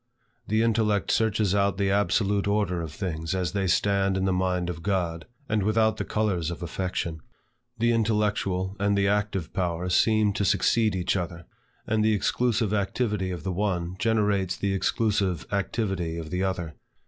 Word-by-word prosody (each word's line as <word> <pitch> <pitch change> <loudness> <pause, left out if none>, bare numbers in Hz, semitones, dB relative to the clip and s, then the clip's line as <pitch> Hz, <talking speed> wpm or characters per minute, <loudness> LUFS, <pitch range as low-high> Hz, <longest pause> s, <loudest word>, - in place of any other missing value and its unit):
The 110 +2 +2
intellect 110 -4 +1
searches 110 -3 +2
out 100 -1 +2
the 100 -1 +1
absolute 100 0 +1
order 100 -4 0
of 80 -3 -5
things 80 -1 -3
as 90 -2 -1
they 100 -2 -1
stand 100 +1 +2
in 95 - 0
the 95 - +2
mind 90 -1 0
of 85 -2 -5
God, 85 -4 -1 0.2
and 105 -2 +1
without 110 +2 +2
the - - -2
colors 95 -7 -1
of 85 +1 -6
affection. 85 -1 -3 0.6
The 120 +1 +2
intellectual 105 -4 0
and 100 0 +2
the 100 0 +2
active 100 -4 -1
powers 90 0 -1
seem 110 -1 +3
to 100 - -1
succeed 105 +2 +2
each 90 +1 0
other, 85 -2 -4 0.4
and 110 0 +1
the 110 0 +3
exclusive 110 +1 +1
activity 105 -1 -1
of 90 -4 -5
the 95 - -2
one, 90 -2 -1
generates 105 -3 +1
the 100 -1 -1
exclusive 100 -4 0
activity 95 -4 -1
of 80 -1 -6
the 90 - -1
other. 90 -4 -3
100 Hz, 170 wpm, -26 LUFS, 90-105 Hz, 0.6 s, seem